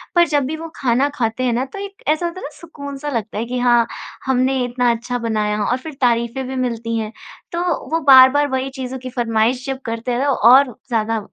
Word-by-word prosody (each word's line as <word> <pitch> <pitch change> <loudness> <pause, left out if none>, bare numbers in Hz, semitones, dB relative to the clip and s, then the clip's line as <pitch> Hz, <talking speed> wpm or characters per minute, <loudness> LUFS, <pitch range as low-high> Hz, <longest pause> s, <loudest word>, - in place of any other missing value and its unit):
पर 345 - +6
जब 290 -3 +1
भी 310 +4 -3
वो 330 +1 -7
खाना 260 +2 +1
खाते 235 0 -1
हैं 245 -2 +1
ना 255 +3 0
तो 275 +9 -9
एक 400 0 -9
ऐसा 310 +3 +1
होता 345 +2 -4
है - - -10
ना - - -5
सुकून 285 -4 -8
सा 295 +2 -5
लगता 225 -5 -3
है 230 - -2
कि 250 +1 -3
हाँ, 240 -1 +4 0.4
हमने 260 0 +1
इतना 245 0 +1
अच्छा 235 +2 -3
बनाया 215 -2 -1
और 250 - +1
फिर 310 +3 -9
तारीफ़ें 235 +2 +1
भी 265 - -5
मिलती 230 -2 -2
हैं। 220 -1 -3 0.4
तो 340 +1 -2 0.3
वो 325 - +2
बार-बार 265 +2 +8
वही 265 0 -2
चीज़ों 260 0 -5
की 255 0 -7
फ़रमाइश 240 +1 0
जब 265 -1 -3
करते 230 +1 -3
हैं 245 +3 0
तो 285 - +2 0.2
और 265 -3 +5
ज़्यादा 225 -2 0
255 Hz, 230 wpm, -19 LUFS, 235-275 Hz, 0.4 s, बार-बार